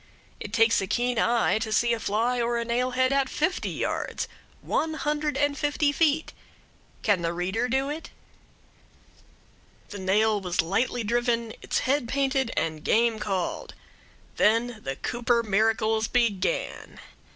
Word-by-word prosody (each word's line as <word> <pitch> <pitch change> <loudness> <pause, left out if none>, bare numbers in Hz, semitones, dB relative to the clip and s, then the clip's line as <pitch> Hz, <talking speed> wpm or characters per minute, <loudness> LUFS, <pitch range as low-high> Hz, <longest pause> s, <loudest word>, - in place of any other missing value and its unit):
It 205 - -7
takes 225 -1 +4
a 195 - -3
keen 245 +3 0
eye 235 -2 +2
to 220 -1 -3
see 235 +2 +3
a 230 - -2
fly 230 +4 0
or 235 0 0
a 235 - -2
nailhead 250 +2 +1
at 275 -1 +2
fifty 320 +5 -1
yards - - -3 0.3
one 315 0 -1
hundred 300 0 -1
and 290 0 +1
fifty 290 0 +1
feet. 315 +1 +1 0.7
Can 205 -5 +2
the 170 0 -1
reader 190 +8 -1
do 265 +2 +1
it? 310 +3 -6 1.8
The 205 - -7
nail 205 +3 +2
was 180 -2 -4
lightly 225 +8 +1
driven, 235 0 0
its - - -1
head 270 -2 +1
painted, 270 -1 0
and 155 -1 -1
game 230 0 +2
called. 190 -4 -3 0.6
Then 230 +2 +2
the 135 - -3
Cooper 235 - 0
miracles 220 +1 +1
began. 235 - -1
235 Hz, 140 wpm, -26 LUFS, 215-260 Hz, 1.8 s, takes